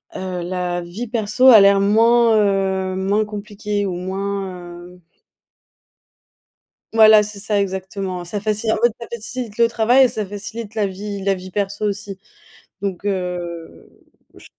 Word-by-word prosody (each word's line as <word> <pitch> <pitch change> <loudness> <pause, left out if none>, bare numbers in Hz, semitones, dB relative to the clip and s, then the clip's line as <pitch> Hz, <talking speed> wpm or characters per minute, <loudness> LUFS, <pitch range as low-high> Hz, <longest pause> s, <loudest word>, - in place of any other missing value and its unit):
hem, - - -5
heu, 185 -1 -4
la 180 -1 -2
vie 190 +8 -7
perso 225 +2 +1
a 230 -5 +10
l'air 200 0 +5
moins, 230 +2 +4
heu, 190 -2 0
moins 200 +3 0
compliquée 210 0 -4
ou 180 - -3
moins, 190 -1 -5
hem 180 0 -17 1.9
Voilà, 220 -1 +7
c'est 210 -1 -6
ça 205 0 0
exactement 190 -1 -4
ça 200 +4 -4
faci 215 +2 -1
en - - +1
fait, 240 -2 +3
ça 235 - -8
facilite 235 -1 -6
le 235 - +4
travail 240 +4 +4
et - - +4
ça 215 -3 -4
facilite 205 +2 -7
la 210 -2 0
vie 200 +1 -6
la 195 0 +1
vie 185 0 -8
perso 200 +1 -2
aussi 205 -1 -4 0.6
donc, 195 -2 -4
heu, 180 -4 -4 0.5
j - - -15
200 Hz, 155 wpm, -20 LUFS, 190-215 Hz, 1.9 s, a